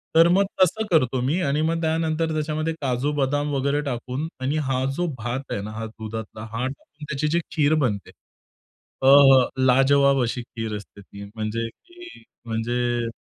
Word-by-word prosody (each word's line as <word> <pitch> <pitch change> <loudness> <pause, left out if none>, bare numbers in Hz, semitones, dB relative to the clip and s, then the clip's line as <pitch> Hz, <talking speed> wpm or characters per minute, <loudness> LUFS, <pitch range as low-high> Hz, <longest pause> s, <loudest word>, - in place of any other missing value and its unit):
तर 165 +1 +7
मग 195 +3 +4 0.2
तसं 220 +5 +3
करतो 130 -5 +2
मी 165 +6 +1
आणि 150 -1 0
मग 165 0 -1
त्यानंतर 160 0 0
त्याच्यामध्ये 155 +1 -1
काजू-बदाम 145 +2 0
वगैरे 140 +2 0
टाकून 130 +4 -3
आणि 140 +4 0
हा 130 -1 0
जो 175 - 0
भात 120 +4 -3
आहे 100 - -2
ना 105 +1 -6
हा 110 - -4
दुधातला 110 0 -7
हा 115 +3 -2
टाकून 145 +2 -10
त्याची 150 +1 -1
जी 170 +3 +1
खीर 150 0 +2
बनते. 100 -6 -3 0.9
अ, 135 - +5 0.6
लाजवाब 135 +1 +4
अशी 120 +1 -2
खीर 115 -2 -5
असते 100 0 -13
ती 100 +1 -11
म्हणजे 110 +1 -2
ती 350 - -15 0.2
म्हणजे 120 +1 -1
135 Hz, 160 wpm, -23 LUFS, 115-155 Hz, 0.9 s, तर